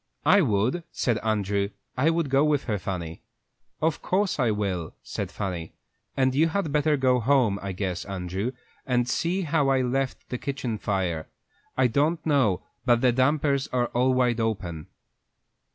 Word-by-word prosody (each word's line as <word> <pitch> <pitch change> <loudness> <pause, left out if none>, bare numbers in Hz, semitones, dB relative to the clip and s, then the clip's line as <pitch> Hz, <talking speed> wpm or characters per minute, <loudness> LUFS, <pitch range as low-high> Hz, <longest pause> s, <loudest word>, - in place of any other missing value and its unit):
"I 190 +6 +6
would," 120 - +1
said 120 -3 0
Andrew 100 -2 0 0.3
"I 140 +5 +3
would 165 -4 0
go 135 +1 +4
with 150 -2 +2
her, 105 -5 -2
Fanny." 85 -4 -5 0.6
"Of 160 -1 +1
course 195 -3 0
I 120 -3 +3
will," 100 -6 -2
said - - -4
Fanny; 90 -5 -4 0.4
"and 130 -1 +3
you 155 +5 +4
had 165 -2 -1
better 150 0 +2
go 130 -2 +3
home, 120 -5 +2
I 100 - -4
guess, 90 -2 -3
Andrew, 95 +4 -3 0.4
and 125 -2 +2
see 175 +9 0
how 150 -3 +1
I 135 -1 +3
left 130 +1 -2
the 125 - -3
kitchen 130 -6 -3
fire. 90 -7 -1 0.5
I 130 - +4
don't 150 +7 +1
know 130 - +2 0.2
but 120 -2 +3
the 125 - +4
dampers 140 +2 +2
are 120 -1 0
all 125 +2 +2
wide 125 -2 +2
open." 95 -8 -2
125 Hz, 165 wpm, -26 LUFS, 100-140 Hz, 0.6 s, I